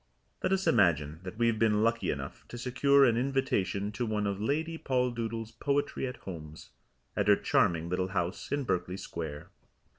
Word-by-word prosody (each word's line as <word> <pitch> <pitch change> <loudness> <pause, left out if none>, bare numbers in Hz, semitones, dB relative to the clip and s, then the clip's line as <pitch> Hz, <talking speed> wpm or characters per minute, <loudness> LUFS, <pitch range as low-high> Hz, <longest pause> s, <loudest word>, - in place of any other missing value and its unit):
Let - - 0
us 195 0 +1
imagine 80 -8 +3
that 95 +2 -8
we 120 - +2
have 115 -2 +2
been 105 -1 +3
lucky 115 0 +1
enough - - -4
to 120 - -8
secure 140 +3 +4
an 115 -3 +3
invitation 120 -7 0
to 120 +3 -2
one 105 -1 0
of 100 0 -2
Lady 160 +7 -1
Poldoodle's 115 -3 -1
Poetry 140 +3 -1
At 125 - -6
Homes, 80 -4 -9 0.4
at - - 0
her - - +7
charming 85 -1 +2
little 90 +1 0
house 90 -1 -3
in 145 0 0
Berkeley 90 -5 -1
Square. 80 -6 -6
110 Hz, 175 wpm, -30 LUFS, 90-130 Hz, 0.4 s, her